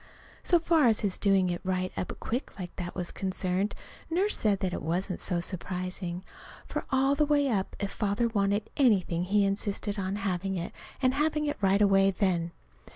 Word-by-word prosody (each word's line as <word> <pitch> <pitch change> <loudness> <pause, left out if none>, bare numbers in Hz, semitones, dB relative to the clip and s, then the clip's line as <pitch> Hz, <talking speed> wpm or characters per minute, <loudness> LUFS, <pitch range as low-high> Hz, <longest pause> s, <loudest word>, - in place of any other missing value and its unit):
So 350 - +4
far 330 -4 +3
as 220 -2 +3
his 200 -3 -1
doing 195 -3 +3
it 175 - -3
right 185 -1 -1
up 180 - -3
quick 245 +5 -4
like 180 -2 -7
that 175 -1 -5
was 180 -2 -3
concerned, 190 +1 -1 0.3
Nurse 380 +6 +2
said 210 -2 +2
that 185 -2 -1
wasn't 180 +4 -2
so 175 - 0
surprising. 180 0 -4 0.4
For - - -4
all 270 +1 +3
the 290 +2 +2
way 290 -2 +3
up, 195 -5 -1
if 200 -1 -2
Father 210 +3 0
wanted 205 -1 0
anything 185 -9 +3
he 200 +2 +3
insisted 200 +1 -1
on 190 0 -2
having 195 -1 -2
it, 170 - -4 0.3
and 255 0 +4
having 300 +1 +1
it 290 - -1
right 195 +1 +4
away 195 -1 +5
then. 180 -4 0
195 Hz, 180 wpm, -29 LUFS, 185-225 Hz, 0.4 s, away